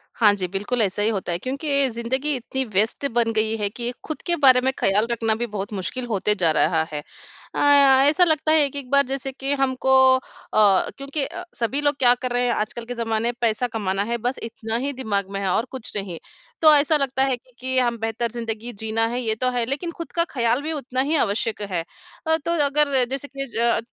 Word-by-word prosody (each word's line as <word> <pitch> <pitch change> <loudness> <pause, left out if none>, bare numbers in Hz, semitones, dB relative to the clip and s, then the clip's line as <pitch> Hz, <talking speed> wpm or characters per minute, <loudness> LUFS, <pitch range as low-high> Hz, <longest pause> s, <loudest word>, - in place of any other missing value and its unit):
हाँ 210 -3 +5
जी, 190 -3 -2
बिल्कुल 205 +6 -2
ऐसा 200 0 0
ही 210 - +2
होता 195 -5 -3
है 170 - -1
क्योंकि 280 - 0
ज़िंदगी 260 +5 -1
इतनी 265 +2 -3
व्यस्त 215 +5 0
बन 230 -1 +2
गई 220 0 +1
है 205 -2 -1
कि, 240 +3 -4
खुद 310 - -6
के 345 -1 +1
बारे 260 -5 +5
में 265 +1 +1
ख़याल 205 +3 +2
रखना 225 -2 0
भी 240 +2 -2
बहुत 205 -1 -5
मुश्किल 195 +6 -4
होते 210 -2 +1
जा 170 -3 +3
रहा 160 +1 +2
है। 150 - -3 0.5
अ, - - -1 0.5
ऐसा 315 +5 +4
लगता 315 -2 +2
है 310 -2 +5
एक 280 - -6
एक 275 -3 -5
बार 280 0 +5
जैसे 270 0 -3
कि 270 +1 -3
हमको 265 -1 0 0.3
अ, - - -5 0.8
क्योंकि 275 +1 -3
अ, 360 - -7
सभी 255 +5 -1
लोग 290 0 +1
क्या 245 -2 +6
कर 250 0 -4
रहे 245 0 +1
हैं 240 - +1
आजकल 230 +2 -3
के 245 - -5
जमाने 225 -1 -1
में - - -3
पैसा 235 +1 +1
कमाना 200 -4 -1
है 235 +3 -2
बस 245 +3 -2
इतना 225 -1 -5
ही 285 - -1
दिमाग 205 -7 -2
में 195 - -3
है 195 - -2
और 225 +6 +1
कुछ 260 -4 -8
नहीं। 195 -4 -4 0.4
तो 310 -2 +8
ऐसा 300 +2 +4
लगता 270 -1 0
है 270 -1 +1
क्योंकि 255 +1 -5
हम 240 -2 +1
बेहतर 225 +1 -2
ज़िंदगी 230 0 -5
जीना 220 +2 -1
है 240 +2 -3
ये 225 -3 0
तो 255 +3 0
है, 240 -2 -1
लेकिन 280 +7 -3
खुद 335 -2 -8
का 335 - +2
ख़याल 240 0 0
भी 310 +2 -4
उतना 260 -3 -2
ही 300 +4 0
आवश्यक 220 -3 -1
है। 185 -5 -3 0.4
अ, 320 0 +3
तो 335 - 0
अगर 280 -2 +3
जैसे 275 +1 -4
कि 275 -1 -5
ज - - -3
अ, 235 0 +2
240 Hz, 230 wpm, -23 LUFS, 220-275 Hz, 0.8 s, तो